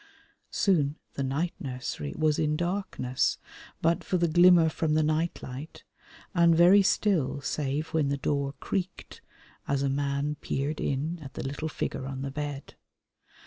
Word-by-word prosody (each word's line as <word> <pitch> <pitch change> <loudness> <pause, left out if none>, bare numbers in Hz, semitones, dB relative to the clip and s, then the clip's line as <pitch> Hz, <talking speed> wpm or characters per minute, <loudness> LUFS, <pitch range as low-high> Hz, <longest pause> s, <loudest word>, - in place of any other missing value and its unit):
Soon 150 -7 +2 0.2
the - - -4
night 140 +6 -1
nursery 125 - -4
was 155 -1 +2
in 150 0 +1
darkness, 175 -8 -1 0.5
but 165 +1 +2
for 185 - 0
the 170 -1 +2
glimmer 175 0 +6
from 155 -1 0
the 155 - +3
night 155 +2 0
light, 130 +5 -8 0.5
and 170 -2 +5
very 180 +4 +7
still 185 -8 +1
save 145 +2 -2
when 155 -3 +1
the 140 0 0
door 140 0 -1
creaked 190 -2 -4 0.5
as 140 -1 0
a 140 - +1
man 140 +1 -1
peered 145 +3 -2
in 155 +6 -1
at 135 -3 -10
the - - -4
little 145 +3 -3
figure 130 - -3
on 135 0 -5
the 135 - -4
bed. 145 -1 -5
150 Hz, 155 wpm, -28 LUFS, 140-170 Hz, 0.5 s, very